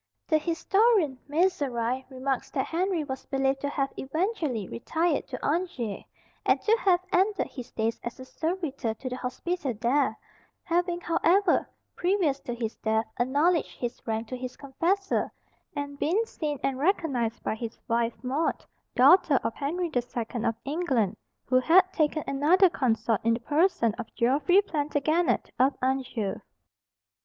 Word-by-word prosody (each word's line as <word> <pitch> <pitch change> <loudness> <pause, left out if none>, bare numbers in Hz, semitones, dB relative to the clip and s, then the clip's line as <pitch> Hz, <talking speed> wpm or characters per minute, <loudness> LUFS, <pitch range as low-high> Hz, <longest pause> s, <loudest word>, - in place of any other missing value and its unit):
The 310 -2 +3
historian 345 - +2
Mezerai 265 -7 0
remarks 265 0 -2
that 265 - -1
Henry 350 -1 0
was 265 -2 -6
believed 270 0 0
to 285 - -1
have 275 -1 -1
eventually 305 - -1
retired 315 - -1
to 255 - -6
Angers, 290 - -1 0.4
and - - +3
to 445 - +3
have 365 -6 +3
ended 390 +2 +2
his 250 -3 -9
days 225 +1 -1
as 235 +2 -6
a 260 - -8
servitor 295 -7 -3
to 255 +4 -6
the 250 - -4
hospital 270 +1 -3
there; 250 -1 +2 0.5
having, 350 +1 0
however, 345 +3 +2 0.3
previous 350 -7 +1
to 240 - -5
his 230 -2 -4
death, 220 0 0
acknowledged 290 +7 +2
his 240 -1 -4
rank 225 0 -2
to 255 - -3
his 255 0 -6
confessor, 355 +9 0 0.4
and 285 0 -5
been 385 +9 +2
seen 300 -9 -4
and 270 -1 0
recognized 275 - 0
by - - 0
his 225 +1 -6
wife 230 0 +1
Maud, 275 +6 -1 0.3
daughter 330 -7 +6
of - - -1
Henry 335 +7 -2
the 245 - +1
Second 235 -1 -4
of 225 - +1
England, 275 - 0 0.3
who 255 0 +4
had 365 +7 +4
taken 310 -1 +1
another 330 +7 +4
consort 230 -5 +1
in 230 0 +3
the - - -4
person 290 - +2
of 235 - -6
Geoffrey 285 +11 +3
Plantagenet 310 0 0
of 265 +2 +3
Anjou. 255 -6 -1
280 Hz, 150 wpm, -27 LUFS, 245-345 Hz, 0.5 s, daughter